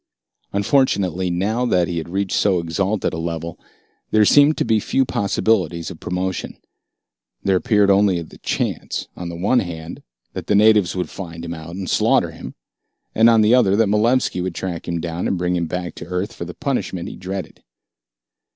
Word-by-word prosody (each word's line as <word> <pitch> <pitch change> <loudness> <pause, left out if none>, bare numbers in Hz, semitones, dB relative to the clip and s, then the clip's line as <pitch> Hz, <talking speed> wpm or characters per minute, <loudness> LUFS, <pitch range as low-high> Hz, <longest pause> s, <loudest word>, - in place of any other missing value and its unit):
Unfortunately, 100 - +1
now 100 +8 0
that 90 -8 +2
he 85 -1 -2
had 80 - -7
reached 95 +1 -1
so 95 -3 +3
exalted 95 +5 -1
a 80 - -3
level, 85 0 -4 0.5
there 110 -1 +4
seemed 145 +6 +5
to - - 0
be 110 -1 +2
few 135 +5 +1
possibilities 95 -6 0
of 85 - -11
promotion. 90 0 -3 0.9
There 95 - +2
appeared 105 -2 +3
only 100 -2 +3
the 80 - -15
chance, - - -3
on 90 -1 -6
the 85 - -6
one 100 +9 +2
hand, 85 -5 -6 0.3
that - - -6
the 105 - +2
natives 105 -4 +4
would 90 - -3
find 85 -3 -7
him 85 - -4
out 80 +1 -8
and 95 -1 -5
slaughter - - +2
him, - - -10 0.6
and 115 +1 +5
on 115 -1 +5
the 110 +2 +4
other 110 -6 +4
that 110 -1 +3
Malevski 110 -1 +2
would 90 -1 -3
track 90 -3 -5
him 85 -1 -2
down 85 +1 -3
and 95 - 0
bring 90 0 0
him 85 -2 -1
back 90 -1 -4
to - - -9
Earth 90 +3 -3
for 85 - -6
the 85 - -9
punishment 130 - -2
he - - -7
dreaded. 95 -1 -6
95 Hz, 190 wpm, -20 LUFS, 85-105 Hz, 0.9 s, seemed